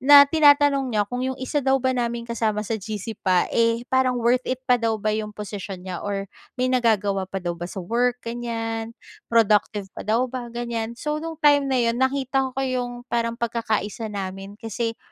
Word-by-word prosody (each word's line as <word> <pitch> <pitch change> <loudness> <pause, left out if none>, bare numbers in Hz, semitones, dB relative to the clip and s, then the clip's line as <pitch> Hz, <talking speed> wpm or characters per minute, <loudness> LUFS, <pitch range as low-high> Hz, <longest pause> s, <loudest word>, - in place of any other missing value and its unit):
na 285 +2 +9
tinatanong 285 -3 +4
niya 210 -3 +1
kung, 245 +5 -4
'yong 260 0 -2
isa 265 +3 -1
daw 265 0 +3
ba 260 0 +1
naming 235 -1 -2
kasama 220 -2 -1
sa 220 0 -3
GC 215 +1 -5
pa, 185 -3 +3
eh, 230 +1 +2
parang 260 -1 +3
worth 240 +1 +3
it 260 0 -3
pa 250 -2 +3
daw 225 -1 +1
ba 215 0 -1
'yong 215 0 -2
posisyon 200 -2 -6
niya 185 -2 -5
or 200 -1 -3 0.3
may 255 0 +1
nagagawa 205 -6 +1
pa 195 - -5
daw 175 -2 -2
ba 175 +1 -6
sa 185 -1 -6
work, 240 +4 +1
ganyan? 230 -1 -4 0.3
Productive 210 -3 +2
pa - - -8
daw 230 +4 +3
ba 250 -1 -5
ganyan? 235 -1 -4
So 300 +4 -2
no'ng 325 0 -5
time 285 -1 +5
na 265 - +1
'yon, 235 0 +1
nakita 265 0 +1
ko - - 0
'yong 245 -2 -3
parang 235 -1 -1
pagkaka-isa 225 -2 -2
namin 195 0 -6
kasi 230 0 -3
235 Hz, 195 wpm, -24 LUFS, 210-255 Hz, 0.3 s, na